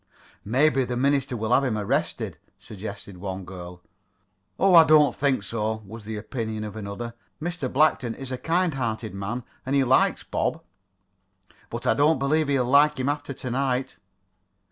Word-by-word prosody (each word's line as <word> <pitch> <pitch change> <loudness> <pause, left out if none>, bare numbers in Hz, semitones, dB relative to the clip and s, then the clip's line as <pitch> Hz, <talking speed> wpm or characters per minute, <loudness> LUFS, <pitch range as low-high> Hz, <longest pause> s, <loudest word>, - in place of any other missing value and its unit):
"Maybe 135 +5 +3
the 125 -1 -3
minister 135 -1 +1
will 110 +2 0
have 135 - +4
him 120 -5 0
arrested," 105 -1 -2 0.2
suggested 100 -2 -8
one 95 0 -5
girl. 90 -1 -9 0.7
"Oh, 195 -1 +4
I 165 -1 +10
don't 155 -2 +5
think 135 -6 +1
so," 110 0 -2
was 110 +2 -10
the 110 0 -5
opinion 110 0 -4
of 105 -1 -6
another. 110 +3 -6 0.3
"Mr. 170 -5 -3
Blackton 130 -5 +2
is 135 -1 -7
a 130 - -2
kind 175 0 +1
hearted 115 -5 -3
man, 105 +6 -4 0.2
and 135 +2 -1
he 140 - +4
likes 130 +1 +3
Bob." - - -2 1.1
"But - - -5
I - - +4
don't 150 +2 +3
believe 150 +3 +1
he'll 135 -3 +2
like 140 +3 +4
him 130 +2 0
after 145 -1 -3
tonight." 130 0 -2
125 Hz, 165 wpm, -25 LUFS, 110-140 Hz, 1.1 s, I